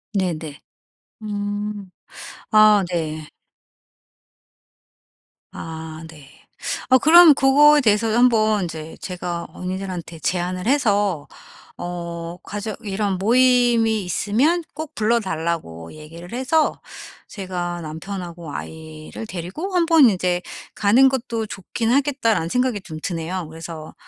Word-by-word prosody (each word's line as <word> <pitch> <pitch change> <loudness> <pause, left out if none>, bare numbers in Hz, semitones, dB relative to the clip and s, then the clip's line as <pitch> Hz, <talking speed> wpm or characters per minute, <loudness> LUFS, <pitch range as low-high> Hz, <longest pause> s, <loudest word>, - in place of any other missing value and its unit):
네네. 165 -6 -2 0.6
음. 205 -1 -4 0.6
아 215 -1 +6
네. 155 -3 -3 2.3
아 160 0 -8
네. 150 -4 -14 0.6
어 260 - +7
그럼 325 +4 +8
그거에 290 +2 +5
대해서 220 -2 +2
한번 220 -5 +3
이제 160 -1 -7
제가 175 -2 -5
언니들한테 180 -2 -6
제안을 180 +2 -2
해서 205 - +1 0.5
어 170 -1 -6
가족 210 0 -5
이런 200 -1 -1
모임이 235 0 +3
있으면 250 - +1
꼭 310 0 -7
불러 225 +2 +2
달라고 160 - -4
얘기를 165 +3 -11
해서 265 +6 +1 0.5
제가 175 -3 -5
'남편하고 170 0 -7
아이를 160 +5 -8
데리고 195 - -5
1 345 -2 +3
번 320 -7 +6
이제 180 -2 0 0.3
가는 235 +6 +5
것도 235 -4 -3
좋긴 225 +5 -3
하겠다.'라는 260 - +1
생각이 250 -2 0
좀 160 -4 -9
드네요. 170 0 -3
그래서 160 -1 -9
195 Hz, 225 characters per minute, -21 LUFS, 170-235 Hz, 2.3 s, 그럼